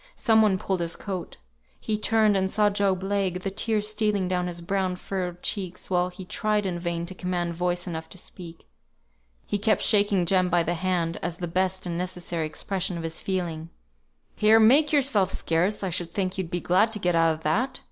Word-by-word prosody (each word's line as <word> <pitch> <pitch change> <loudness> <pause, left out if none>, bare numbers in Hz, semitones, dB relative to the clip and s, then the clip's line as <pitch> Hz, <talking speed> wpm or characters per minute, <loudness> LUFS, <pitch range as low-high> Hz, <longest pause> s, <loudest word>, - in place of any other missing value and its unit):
Some 225 -4 +4
one 205 -3 +3
pulled 190 0 -2
his 170 -1 -1
coat. 185 -4 -6 0.4
He 215 - -1
turned, 215 -1 +3
and 190 0 +1
saw 210 +1 +2
Job 195 -2 0
Legh, 195 -2 -1
the 195 - -2
tears 210 +1 0
stealing 210 -3 0
down 180 -1 -1
his 175 -1 -4
brown 185 +1 -1
furrowed 180 -1 -5
cheeks, 185 -2 -3
while 180 0 +2
he 185 +1 -10
tried 210 +1 -1
in 175 -2 -2
vain 170 -1 -2
to 185 - -5
command 180 -2 -2
voice 175 +1 -1
enough 160 -3 -6
to - - -10
speak. 170 -2 -10 0.8
He 205 - -2
kept 215 +1 +2
shaking 200 -4 +3
Jem 185 0 +2
by 175 -1 +3
the 170 - -1
hand 175 -2 -1
as 170 -1 -3
the 175 - -4
best 185 +2 -1
and 170 -1 -3
necessary 175 -3 -3
expression 185 +2 -3
of 165 - -5
his 165 0 -4
feeling. 170 -4 -3 0.7
"Here! 215 +1 +5
make 275 +7 +5
yourself 260 -10 +3
scarce! 180 +6 0
I 190 - -1
should 170 0 -2
think 185 0 -1
you'd 190 -4 -3
be 175 -1 -2
glad 205 +5 +3
to - - +1
get 180 -3 0
out 165 -1 +3
of 155 - -14
that!" 250 - 0
185 Hz, 205 wpm, -26 LUFS, 175-205 Hz, 0.8 s, Here